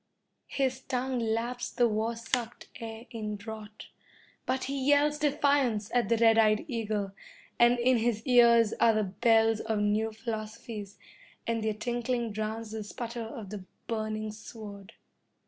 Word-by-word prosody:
His 260 -2 0
tongue 260 -1 -2
laps 235 +2 -1
the 240 -2 +3
war 220 +1 -1
sucked 235 0 -3
air 225 0 -7
in 215 -3 -4
drought, 215 0 -9 0.6
but 260 +1 0
he 270 0 -2
yells 295 +1 +4
defiance 280 -7 +2
at 245 -2 +2
the 230 - +3
red 225 0 +5
eyed 215 +5 +4
eagle, 215 -6 -2 0.5
and 240 +1 +6
in 245 +1 +3
his 225 -1 0
ears 235 -3 +6
are 230 - +5
the 215 - +2
bells 225 +2 +3
of 220 -1 -1
new 210 +2 +1
philosophies, 215 -2 -6 0.5
and 230 -1 -1
their 215 -1 0
tinkling 240 +1 -2
drowns 215 +1 -4
the 220 -1 -4
sputter 235 +3 -5
of 220 -3 -7
the 205 -3 -6 0.2
burning 215 -1 -2
sword. 210 -1 -10
225 Hz, 145 wpm, -29 LUFS, 215-240 Hz, 0.6 s, and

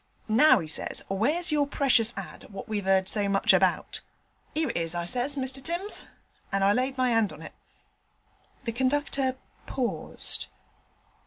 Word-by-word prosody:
"Now," 245 +8 +6
he 165 -6 -4
says, 155 - -2
"where's 295 - 0
your 290 -2 +2
precious 255 -5 +3
ad. 195 - -8
what 195 -2 -8
we've 205 -3 -3
'eard 190 -1 +3
so 205 -1 +3
much 195 0 +4
about?" - - +1 0.5
"'Ere 310 -5 0
it - - -4
is," 165 0 0
I 170 0 -2
says, 250 +8 +1
"Mr 265 0 -1
Timms," 350 +7 -2 0.5
and 195 0 +1
I 200 +1 +5
laid 260 +3 -1
my 255 -1 +2
'and 225 -4 +2
on 155 +1 -11
it.' - - -10 1.1
The 235 - -2
conductor 265 +1 0 0.3
paused. 250 -3 -2
245 Hz, 160 wpm, -27 LUFS, 195-275 Hz, 1.1 s, Now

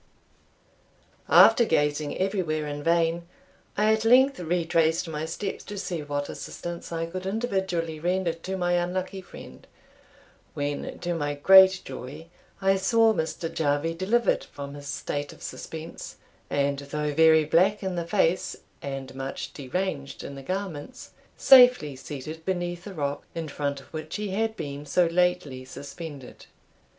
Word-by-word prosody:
After 240 - +7
gazing 150 -5 0
everywhere 185 -6 -1
in 145 0 -5
vain, 170 +1 +1 0.5
I 215 +1 +4
at 220 0 0
length 260 +3 +5
retraced 165 -1 +1
my 155 -1 -3
steps 190 +5 -4
to 205 - -7
see 175 -4 -3
what 145 -1 -3
assistance 175 0 -7
I 165 0 -2
could 185 +3 -6
individually 190 -7 -2
render 175 +1 0
to 185 +3 -5
my 175 -1 0
unlucky 185 +2 -1
friend, - - -13 0.9
when, 145 0 -3
to 175 0 -1
my 145 -3 -2
great 190 +4 +7
joy, 140 +5 -8 0.3
I 195 0 +4
saw 225 +3 +4
Mr. 160 -1 -2
Jarvie 155 0 0
delivered 210 +8 +1
from 140 0 -8
his 145 0 -9
state 145 0 -4
of - - -15
suspense; 160 0 -7 0.3
and 140 0 0
though 150 +1 -3
very 160 0 +5
black 190 +7 +3
in 190 -1 -2
the 170 -1 -3
face, 170 +1 +1 0.3
and 135 -1 -6
much 135 0 -5
deranged 140 0 -4
in 140 - -7
the 135 - -8
garments, 185 - -5 0.3
safely 250 - +7
seated 145 +4 -8
beneath 175 -1 -3
the 200 -2 -8
rock, 145 -2 -2
in 165 -1 -3
front 140 -1 -2
of 135 - -18
which 155 0 -5
he 210 -1 -3
had 220 +3 -1
been 140 0 -5
so 175 +5 +3
lately 170 -6 0
suspended. 140 0 -9
165 Hz, 145 wpm, -26 LUFS, 145-190 Hz, 0.9 s, After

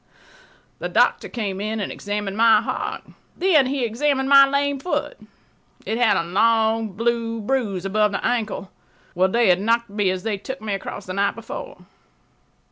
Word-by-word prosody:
The - - -4
doctor - - +2
came 200 -5 -4
and 215 +1 -3
examined 205 0 -4
my 225 0 +5
heart. - - -4 0.3
Then 335 -8 +4
he 265 -2 -1
examined 265 +3 0
my 275 0 +8
lame 280 0 0
foot. 360 - -3 0.7
It 225 - -2
had 245 -3 +4
a - - 0
long 220 +3 +1
blue 230 +2 -1
bruise 210 -5 -2
above 210 +1 +2
the 195 - -3
ankle, 220 -5 -2 0.4
where 185 +1 +2
they 230 +2 +2
had 180 +1 +3
knocked 230 +1 +1
me 205 -2 0
as 185 0 -3
they 215 -3 -2
took 265 +6 -7
me 215 -2 -4
across 195 0 -6
the 185 - -5
night 200 +1 0
before. - - -9
225 Hz, 165 wpm, -22 LUFS, 200-245 Hz, 0.7 s, my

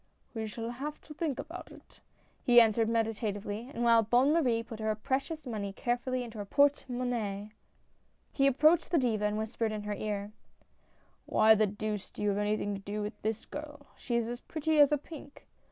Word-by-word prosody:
"We 220 -2 -3
shall 230 +2 -5
have 285 +5 -5
to 305 - -11
think 300 -3 -2
about - - -8
it," - - -17 0.4
he 240 -2 +7
answered 225 -1 +4
meditatively, 220 0 -2
and 240 - -3
while 230 -1 +6
Bonne 245 +6 +3
Marie 245 -9 +2
put 225 -2 -9
her 220 0 0
precious 275 +7 -2
money 205 -5 -4
carefully 245 +3 -1
into 225 -2 -8
her 205 - -4
porte 285 +7 +3
monnaie, 225 -5 -3 0.8
he 275 -1 +3
approached 305 +5 +4
the 340 - +2
Diva 225 -6 +1
and 210 0 0
whispered 220 +1 -2
in 210 -1 -4
her 210 0 -3
ear: 205 0 -3 0.3
' - - -37
" - - -36
Why 220 0 +6
the 215 0 +3
deuce 210 0 -4
do - - -7
you 210 - +2
have 200 0 0
anything 210 0 0
to 195 - -4
do 205 +1 -4
with 210 +2 -6
this 220 +1 -2
girl 295 -1 -8
— - - -29
she 240 - -3
is 235 -1 +1
as 240 +1 -5
pretty 315 0 0
as 290 -1 +7
a 295 - +3
pink. 290 -1 -12
230 Hz, 205 wpm, -31 LUFS, 210-270 Hz, 0.8 s, he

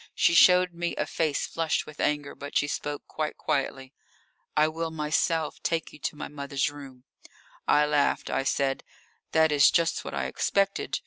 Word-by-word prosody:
She - - +3
showed 180 +1 +6
me 170 0 -3
a - - -1
face 155 -3 -1
flushed 165 -1 -1
with 155 - -13
anger, 145 -1 -1
but 145 0 -4
she 145 - +1
spoke 145 0 -4
quite 155 -1 -4
quietly. 135 -1 -2 0.6
"I 155 +1 +5
will 165 +1 -3
myself 155 0 -1
take 165 -1 -2
you 150 - -13
to 150 - -3
my 150 - -6
mother's 140 -1 -2
room." 135 -3 -12 0.6
I 150 0 +4
laughed. 150 -1 +1
I - - +1
said: 135 0 0 0.5
"That 160 -1 +4
is 145 -1 +6
just 170 -1 +1
what - - -6
I - - -1
expected. 200 0 0
150 Hz, 175 wpm, -27 LUFS, 145-165 Hz, 0.6 s, showed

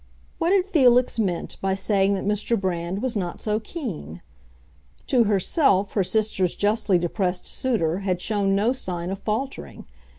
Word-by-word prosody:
What 335 +2 +1
had 385 -2 +3
Felix 255 - +3
meant 185 -6 -2
by 190 0 0
saying 195 0 +2
that 190 - -4
Mr. 210 +2 0
Brand 185 +2 -2
was 255 -2 -1
not 180 -4 -3
so 215 0 0
keen? 205 - -7 0.8
To 245 -3 +3
herself 200 - +2
her 200 - +1
sister's 210 -3 0
justly 205 -2 +2
depressed 180 +1 -2
suitor 190 - 0
had 185 -3 -1
shown 200 0 0
no 215 +5 +2
sign 180 -7 -4
of 195 - -4
faltering. 215 - -4
200 Hz, 155 wpm, -24 LUFS, 185-230 Hz, 0.8 s, had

